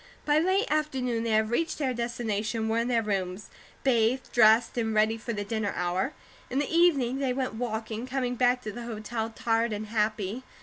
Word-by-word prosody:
By 295 +1 +4
late 375 +5 +2
afternoon 265 -6 0
they 230 - -1
had 220 0 +2
reached 325 +7 0
their 270 -4 0
destination 230 -2 -2
and 220 - -1
were 225 - +2
in 235 - 0
their 235 -2 +2
rooms, 195 -1 -3 0.3
bathed, 250 0 +2
dressed, 225 0 +5
and 225 -2 -1
ready 215 +1 +3
for 225 +1 -5
the 205 -2 -3
dinner 210 0 -2
hour. 180 +10 -1 0.4
In 260 - -2
the 290 +3 0
evening 275 -7 +3
they 265 -2 0
went 260 -2 -2
walking, 220 0 -4
coming 255 -1 -1
back 250 0 +2
to 215 - -4
the 235 +3 -7
hotel 220 0 -4
tired 225 0 0
and 210 +1 -3
happy. 215 0 -1
230 Hz, 200 wpm, -28 LUFS, 220-255 Hz, 0.4 s, dressed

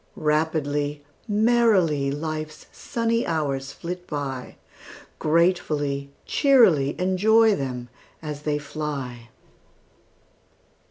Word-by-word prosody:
Rapidly, 150 -2 -1 0.2
merrily, 210 -10 +3
Life's 155 +1 -5
sunny 230 0 -1
hours 140 -4 -2
flit 180 +1 -7
by, 135 -4 -5 0.6
Gratefully, 150 -4 +1 0.2
cheerily 190 - +4
Enjoy 215 +5 +4
them 125 -4 -4 0.3
as 150 -2 -6
they 150 -1 -1
fly! 140 -5 -5
155 Hz, 75 wpm, -24 LUFS, 140-185 Hz, 0.6 s, cheerily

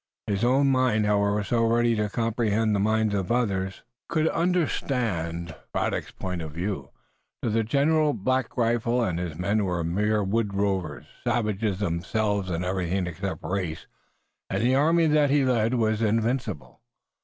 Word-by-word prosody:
His 100 +1 -1
own 135 +3 +4
mind 125 -5 +2
however 105 0 +2
so 115 +4 +1
ready 115 +1 +3
to 105 -1 0
comprehend 115 -1 0
the 100 - +1
mind 110 +1 +1
of 100 +1 -1
others, 95 -6 -1 0.3
could 160 -1 +1
understand 120 - -1 0.2
Braddock's - - -1
point 90 -2 -5
of 80 -2 -7
view. 95 +5 -3 0.5
To 115 - 0
the 115 +1 +2
general 145 +5 +2
Black 130 +4 -1
Rifle 120 +1 +1
and 90 -6 -1
his 85 -4 -4
men 100 +4 +1
were 90 -3 -1
mere 105 +5 +1
woods 100 0 -1
rovers, 95 -7 -1 0.2
savages 105 -3 0
themselves 100 +2 -1
in 85 0 -2
everything 90 0 -1
except 95 +3 -5
race, 90 -4 -3 0.6
and - - -1
the 125 +2 +3
army 165 +5 +4
that 150 -2 +3
he 140 -1 +3
led 120 -1 +2
was 110 -2 +1
invincible. 115 - -1
110 Hz, 155 wpm, -26 LUFS, 95-120 Hz, 0.6 s, own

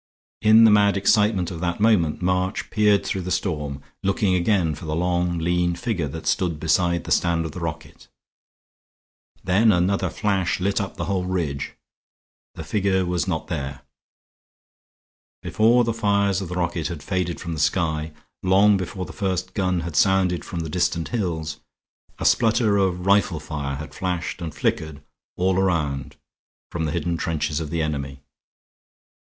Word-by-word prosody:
In 110 +1 +7
the 110 - +7
mad 100 -1 +4
excitement 100 -2 +2
of 85 - -6
that 85 +1 -2
moment 95 -7 +2
March 90 +2 -1
peered 105 -2 +3
through 95 - -2
the 90 - -5
storm, 75 -7 -2 0.2
looking 95 0 +1
again 90 -3 +2
for 85 - -9
the 75 0 -2
long 90 0 0
lean 85 +1 0
figure 100 -8 -2
that 80 +3 -7
stood 80 0 0
beside 85 +2 +1
the - - -8
stand 85 -2 +2
of 80 - -5
the 90 - -7
rocket. 80 -2 -6 1.4
Then 105 +5 +4
another 95 0 +1
flash 95 -2 0
lit 100 +3 0
up 100 - -6
the - - -3
whole 95 -2 -1
ridge. 80 -7 -3 0.8
The 80 - -6
figure 95 +2 0
was 90 0 -1
not 80 -4 -2
there. 70 -5 -5 1.6
Before 115 +3 +3
the 115 0 0
fires 100 -3 +1
of 95 - -5
the 90 - -4
rocket 85 -2 -1
had 85 -3 -6
faded 90 -3 -2
from 85 -2 -5
the 80 - -5
sky, 80 -1 0 0.3
long 100 +2 +4
before 95 0 -4
the - - -10
first 95 -2 -2
gun 90 -3 0
had 85 -2 -6
sounded 95 0 +2
from 85 - -5
the 80 - -4
distant 85 0 -1
hills, 85 -9 -3 0.6
a - - -5
splutter 115 -2 +3
of 90 -2 0
rifle 100 -4 +3
fire 70 -2 -4
had 75 +2 -8
flashed 90 -1 -3
and 80 -3 -5
flickered 75 +2 -2 0.3
all 95 +1 +2
around 75 -8 -1 0.6
from 80 -2 -2
the 75 - -2
hidden 85 +2 -1
trenches 80 -2 -1
of 80 -2 -5
the 80 0 -1
enemy. 70 -3 -4
90 Hz, 165 wpm, -23 LUFS, 80-95 Hz, 1.6 s, In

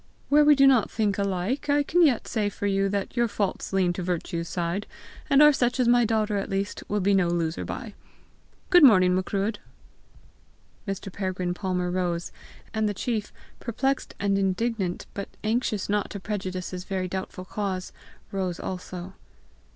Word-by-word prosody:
Where 295 +1 +6
we 295 0 +7
do 275 0 +5
not 255 -6 +5
think 210 -3 0
alike, 200 +8 -1
I 290 0 +4
can 345 +4 +3
yet 270 -8 +3
say 210 -3 0
for 205 - -5
you 195 0 +1
that 200 +2 -3
your 240 -1 +2
faults 205 -2 -2
lean 185 -2 +2
to 180 - -4
virtue's 170 -1 -3
side, 175 +4 -2 0.4
and 280 0 +7
are 300 0 +8
such 245 -1 0
as 250 - +3
my 240 0 +5
daughter 215 -2 +1
at 195 - -3
least 195 +1 -2
will 210 0 0
be 200 +2 +3
no 190 -3 +3
loser 170 -1 -1
by. - - -6 0.8
Good 355 -3 +7
morning, 185 -8 +7
Macruadh." 200 +3 -1 1.3
Mr. 195 -1 -5
Peregrine 185 -2 -2
Palmer 180 -1 -2
rose; 175 -2 -1 0.4
and 220 -1 +1
the 205 - -3
chief, 220 -1 -2 0.3
perplexed 265 +4 -2
and 200 -1 +1
indignant, 195 -1 -1
but 200 - -5
anxious 220 -2 0
not 205 0 0
to 200 - -6
prejudice, 185 -3 -4
his 180 -1 -5
very 185 -1 -2
doubtful 185 0 -5
cause, 190 -2 -4 0.4
rose 185 -3 -2
also. 180 0 -6
200 Hz, 170 wpm, -26 LUFS, 185-225 Hz, 1.3 s, are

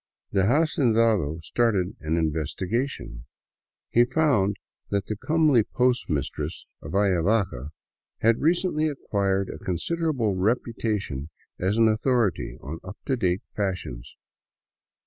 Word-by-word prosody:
The 95 -1 +2
hacendado 115 - +2
started 105 -2 +1
an 80 +2 -1
investigation. 80 - -2 0.7
He 120 - +6
found 125 -7 +2 0.3
that 100 -1 0
the 110 - -3
comely 155 +1 +3
post 125 +2 +1
mistress 75 -4 -3 0.2
of - - -7
Ayavaca 95 - +1 0.5
had 115 +1 +4
recently 165 -1 +2
acquired 100 -8 -1
a - - -10
considerable 125 - 0
reputation 105 - -1 0.3
as 95 +4 0
an 115 -1 +5
au 110 0 +2
thority 120 -5 0
on 80 +4 -6
up 95 +2 -9
to 135 - +1
date 95 -5 0
fashions. 90 - -4
105 Hz, 115 wpm, -25 LUFS, 90-125 Hz, 0.7 s, He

